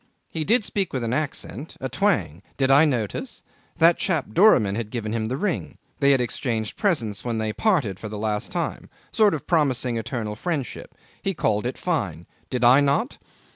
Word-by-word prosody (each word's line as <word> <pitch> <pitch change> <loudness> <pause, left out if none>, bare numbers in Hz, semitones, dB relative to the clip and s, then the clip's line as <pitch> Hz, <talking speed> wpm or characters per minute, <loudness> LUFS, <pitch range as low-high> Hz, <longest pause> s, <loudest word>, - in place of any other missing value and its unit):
He 160 - -2
did 220 +6 +3
speak 200 -1 -1
with 130 -3 -2
an 115 +1 -1
accent 150 +1 -3
a 130 - -3
twang 110 - 0 0.2
did 135 -1 +2
I 145 +4 +7
notice? 130 - -3 0.3
That 165 +1 +5
chap 165 - 0
Doramin 125 - +5
had 110 0 -3
given 110 -2 -4
him 110 -1 -1
the 130 +3 -2
ring. 190 -1 -2 0.2
They 140 -2 +4
had 135 -2 +5
exchanged 115 -3 -2
presents 120 - 0
when 120 -2 -2
they 110 -1 -2
parted 145 - +1
for 110 - -6
the 105 - -6
last 105 0 -2
time. - - -3 0.2
Sort 210 -5 +4
of 150 - -7
promising 130 -8 +1
eternal 110 -2 -4
friendship. 150 +1 -4 0.3
He 195 -1 -2
called 110 -5 0
it 125 - -5
fine 100 - -2 0.2
did 125 -1 -2
I 125 +3 +7
not? 145 - +1
130 Hz, 185 wpm, -24 LUFS, 110-160 Hz, 0.3 s, I